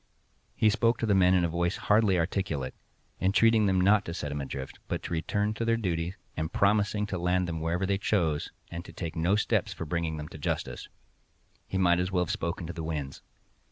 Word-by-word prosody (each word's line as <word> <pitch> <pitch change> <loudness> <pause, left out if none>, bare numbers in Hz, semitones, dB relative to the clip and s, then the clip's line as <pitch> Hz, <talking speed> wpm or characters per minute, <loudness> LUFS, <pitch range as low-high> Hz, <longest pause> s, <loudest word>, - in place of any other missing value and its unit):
He 110 - +4
spoke 115 +2 +2
to - - -1
the 105 - +3
men 95 -1 +5
in 90 -1 +3
a - - +2
voice 85 +2 -1
hardly 105 -3 +3
articulate, 80 -6 -1 0.5
entreated 110 +3 +4
them 95 -1 +2
not 100 +3 +4
to 85 - -5
set 75 -5 -4
him 75 0 -3
adrift, 65 0 -6
but - - -3
to - - -4
return 105 +6 0
to 110 - -3
their 115 0 +2
duty, 90 -4 -2 0.2
and 80 +1 -2
promising 105 +1 +2
to 95 -3 -3
land 90 +1 +1
them 80 -1 -3
wherever 85 +4 0
they 95 0 0
chose, 85 -8 0 0.2
and 85 0 -5
to - - -11
take 85 -2 -5
no 85 +4 +2
steps 105 - +1
for 85 - -6
bringing 80 0 -2
them 75 0 -6
to 80 - -10
justice. - - -3 0.8
He 95 - -2
might 90 -2 +4
as 90 +1 -1
well 90 -2 +2
have - - -3
spoken 85 +1 -3
to 85 - -5
the 80 -1 -5
winds. 75 -4 -4
90 Hz, 220 wpm, -29 LUFS, 80-100 Hz, 0.8 s, men